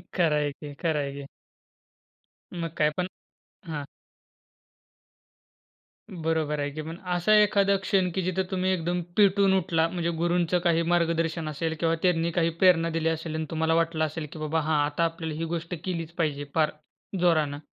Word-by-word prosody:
खरं 165 -5 0
आहे 145 -1 0
की, 145 0 -10
खरं 160 -1 -1
आहे 140 -1 -3
की. 140 0 -7 1.3
मग 170 -1 -3
काय 150 0 +3
पण 180 0 0 0.6
हां. 150 -3 -4 2.3
बरोबर 160 -4 -1
आहे 145 0 -1
की, 155 +2 -6
पण 160 +2 -7 0.2
असा 175 +5 +3
एखादा 200 -1 +3
क्षण 190 -2 +2
की 190 - 0
जिथं 185 +1 0
तुम्ही 185 0 0
एकदम 175 0 -1 0.2
पेटून 200 -1 +5
उठला? 165 -3 +1
म्हणजे 170 -1 -2
गुरूंचं 175 0 +2
काही 170 -1 +3
मार्गदर्शन 165 -1 +1
असेल 160 +2 -2
किंवा 165 -1 +2
त्यांनी 170 -2 +2
काही 165 0 +3
प्रेरणा 165 -3 +5
दिली 160 - +1
असेल 160 0 -3
आणि 160 0 -2
तुम्हाला 160 0 +1
वाटलं 165 -1 +1
असेल 155 +1 -5
की 160 - -8
बाबा 155 +1 0
हां 155 0 +1
आता 150 +3 0
आपल्याला 165 -1 -3
ही 165 - -1
गोष्ट 170 +1 -4
केलीच 170 -3 -3
पाहिजे 145 -3 0
फार 155 -2 +3 0.5
जोरानं. 155 -5 +2
165 Hz, 165 wpm, -27 LUFS, 155-175 Hz, 2.3 s, पेटून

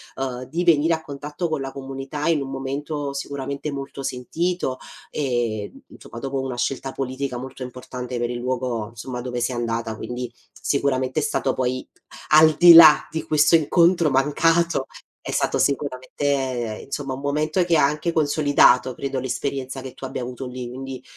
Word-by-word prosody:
uhm, 130 -1 -4
di 170 +6 -2
venire 165 -1 +4
a 160 - -1
contatto 150 +4 -5
con 155 - -1
la 135 0 -5
comunità, 135 +2 -5
in 165 -3 +2
un 135 - -5
momento, 140 +2 -4
sicuramente, 140 +1 -4
molto 140 -1 -6
sentito, 135 +3 -2 0.3
e, 120 -7 -2 0.2
insomma, 115 - -11
dopo 135 +2 -3
una 130 -1 -3
scelta 135 +2 -2
politica 130 -1 -3
molto 130 +1 -7
importante, 125 0 -6
per 120 0 -1
il 120 - -3
luogo, 120 -3 -2
insomma, 125 +2 -6
dove 125 0 -4
sei 125 +1 -1
andata, 115 -1 -2
quindi, 125 +2 -5 0.2
sicuramente 130 -1 0
è - - -1
stato 130 - 0
poi 130 0 -1 0.5
al 155 0 +8
di 175 -1 +10
là 155 -3 +9
di 160 0 -4
questo 155 +2 +4
incontro 170 +1 +4
mancato, 165 +3 +2 0.3
è - - -6
stato, - - 0
sicuramente, 135 -1 -2 0.5
ehm, - - -9
insomma, 135 -1 -4
un 135 - -9
momento 155 +5 +1
che 170 -1 +2
ha 150 - +5
anche 150 +4 -1
consolidato, 145 -4 +4
credo, 135 +1 -3
l'esperienza 130 +1 -3
che 130 -1 -8
tu - - -8
abbia 130 -1 -4
avuto 125 +2 -6
lì, 125 -1 -6
quindi, 130 +1 -7
135 Hz, 170 wpm, -23 LUFS, 125-150 Hz, 0.5 s, di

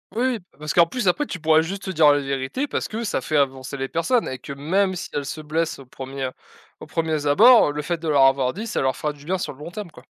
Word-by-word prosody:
Oui, 245 0 0
p 180 - -25
parce 150 0 -4
qu'en 170 -1 +5
plus 240 +2 -3
après, 285 +11 +2
tu 185 - -5
pourrais 160 0 +4
juste 190 +4 -5
dire 155 -4 +5
la 145 - +3
vérité 135 - -3
parce - - -2
que, 225 +2 -4
ça 200 - -1
fait 155 +4 -1
avancer 135 0 -1
les 135 0 -3
personnes 200 - 0
et 130 - -5
que 140 - -7
même 185 +7 0
si - - -6
elles 145 -1 -2
se 150 - -5
blessent 160 +2 -2
au 135 - -12
1re 130 0 -6 0.5
aux - - -10
premiers 160 -3 -1
abords, 220 - +7
le 150 +1 -3
fait 170 +3 -1
de 165 - -5
leur 145 -3 +4
avoir 135 -1 +2
dit, 215 +5 -5
ça 220 - -2
leur 130 0 +1
fera 150 -1 -2
du 145 -1 -16
bien 185 +3 0
sur 170 - -4
le 130 - -19
long 150 - -7
terme, 185 -1 -7
quoi. 125 - -15
155 Hz, 275 wpm, -23 LUFS, 140-185 Hz, 0.5 s, abords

